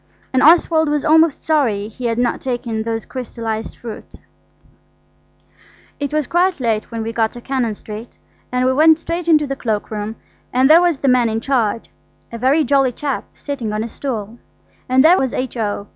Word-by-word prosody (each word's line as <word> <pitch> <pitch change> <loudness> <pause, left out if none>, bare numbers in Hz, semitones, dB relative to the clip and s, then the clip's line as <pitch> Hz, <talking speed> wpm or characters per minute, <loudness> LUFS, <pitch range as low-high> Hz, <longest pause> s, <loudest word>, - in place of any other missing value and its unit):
And 260 - +3
Oswald 320 -1 +5
was 295 -1 -1
almost 320 -1 +4
sorry 240 -10 +1
he 240 +3 -8
had 230 -1 -1
not 245 -1 0
taken 240 -3 -3
those 225 0 -3
crystallised 230 -3 -5
fruits. 230 -3 -9 1.8
It 285 -1 -3
was 305 -1 0
quite 355 +3 +1
late 225 -4 -1
when 230 -1 -4
we 225 +1 -4
got 225 -1 +1
to 240 - -9
Cannon 245 -4 -2
Street, 215 +3 -10 0.3
and 250 0 +1
we 260 - +3
went 315 +3 +5
straight 335 +1 -4
into 305 -3 +4
the 275 -1 -3
cloak 220 -6 -3
room, 215 +1 -4 0.4
and 255 +2 +3
there 330 +2 +8
was 350 -4 +2
the 275 - -2
man 250 -2 +3
in 220 0 -1
charge, 230 -3 -1 0.4
a 230 - -6
very 275 +6 +3
jolly 270 -1 +2
chap, 275 +2 -3
sitting 270 -7 -4
on 215 +1 -1
a - - -4
stool. 230 -3 -5 0.5
And 260 +3 +4
there 355 +4 +6
was 260 -2 -1
H.O. 220 -5 -3
255 Hz, 185 wpm, -18 LUFS, 225-290 Hz, 1.8 s, there